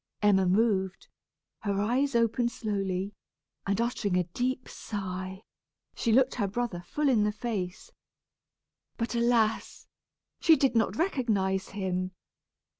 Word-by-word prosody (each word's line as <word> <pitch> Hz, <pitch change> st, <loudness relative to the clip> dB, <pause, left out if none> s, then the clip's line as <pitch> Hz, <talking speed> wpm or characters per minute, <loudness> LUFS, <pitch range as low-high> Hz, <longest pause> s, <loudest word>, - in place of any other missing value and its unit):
Emma 190 Hz, -2 st, +4 dB
moved, 190 Hz, -1 st, +1 dB, 0.5 s
her 200 Hz, -2 st, -1 dB
eyes 250 Hz, +6 st, +1 dB
opened 235 Hz, +1 st, +2 dB
slowly, 195 Hz, -3 st, -2 dB, 0.5 s
and 200 Hz, +1 st, +1 dB
uttering 235 Hz, -5 st, 0 dB
a 180 Hz, -, +3 dB
deep 250 Hz, +9 st, -2 dB
sigh, 190 Hz, -1 st, -5 dB, 0.5 s
she 230 Hz, -, 0 dB
looked 255 Hz, +3 st, +4 dB
her 205 Hz, -5 st, 0 dB
brother 210 Hz, -3 st, -2 dB
full 300 Hz, -1 st, 0 dB
in 235 Hz, -6 st, +4 dB
the 210 Hz, -, +2 dB
face. 210 Hz, -5 st, -4 dB, 1.1 s
But 230 Hz, 0 st, -2 dB
alas! 235 Hz, -2 st, +1 dB, 0.5 s
she 325 Hz, -, +6 dB
did 270 Hz, -3 st, +2 dB
not 225 Hz, -, +2 dB
recognize 215 Hz, -, 0 dB
him. 185 Hz, -2 st, -2 dB
210 Hz, 120 wpm, -29 LUFS, 190-240 Hz, 1.1 s, she